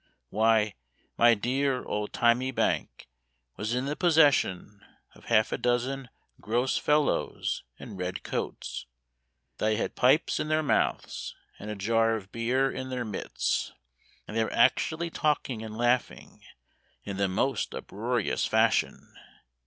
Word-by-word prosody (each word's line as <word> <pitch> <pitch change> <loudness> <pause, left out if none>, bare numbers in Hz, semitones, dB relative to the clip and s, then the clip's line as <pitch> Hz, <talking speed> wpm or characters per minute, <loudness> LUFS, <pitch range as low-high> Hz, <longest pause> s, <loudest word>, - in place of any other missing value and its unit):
Why, 110 0 +3 0.4
my 120 0 +6
dear 130 +4 0
old 105 0 -3
thymy 120 +2 +2
bank 130 - -1 0.5
Was 110 +3 -2
in 125 +1 -1
the 145 +2 -2
possession 145 - +2 0.3
Of - - -18
half 110 -2 +3
a - - -2
dozen 125 +2 -1 0.3
gross 120 +5 0
fellows 150 0 0 0.2
in - - -9
red 90 0 -4
coats, - - -4 0.7
Thy 110 0 +2
had 105 - -2
pipes 135 +5 +3
in - - -2
their 155 0 +1
mouths, - - -1 0.2
And 105 - -7
a 105 - -3
jar 115 +3 +2
of 100 -3 -8
beer 125 +4 +1
in 130 0 -5
their 125 -2 -3
midst, 105 -3 -2 0.5
And 110 - -7
they 115 - +3
were - - -4
actually 160 +7 +2
talking 145 -8 -1
and 110 -1 -7
laughing 120 +1 -1 0.6
In 100 -2 -5
the 100 0 +2
most 105 +9 -1
uproarious 115 +2 -2
fashion. - - +1
120 Hz, 135 wpm, -28 LUFS, 110-130 Hz, 0.7 s, my